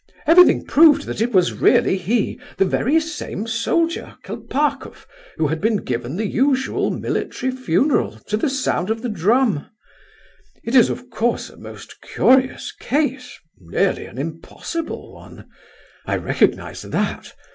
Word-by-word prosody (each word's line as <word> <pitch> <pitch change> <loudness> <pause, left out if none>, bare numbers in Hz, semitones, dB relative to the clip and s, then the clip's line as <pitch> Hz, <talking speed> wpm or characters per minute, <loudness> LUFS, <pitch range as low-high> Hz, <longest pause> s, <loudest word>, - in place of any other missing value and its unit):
Everything 355 +3 +6
proved 310 -1 +5
that - - -5
it 240 +2 +1
was 185 -5 +3
really - - +3
he, 205 +4 -1 0.2
the 195 - +3
very 275 +11 +2
same 310 - -5
soldier 250 +9 -1
Kolpakoff 295 +2 -3 0.3
who 160 - +1
had 160 +1 -2
been 220 0 +2
given 125 -3 -4
the 215 +4 -2
usual 265 +4 +1
military 260 - -3
funeral 255 - 0
to 210 - -1
the 225 +7 0
sound 260 -8 -1
of 225 +1 -2
the 245 - -2
drum. 210 - +1 0.9
It 230 - -4
is 250 -3 +6
of 250 0 -6
course 230 +1 -1
a - - -17
most - - -12
curious 260 0 +2
case—nearly 250 - -2
an - - -13
impossible 165 - -6
one. - - -14 0.6
I - - 0
recognize - - 0
that... - - -3
235 Hz, 135 wpm, -20 LUFS, 185-270 Hz, 0.9 s, Everything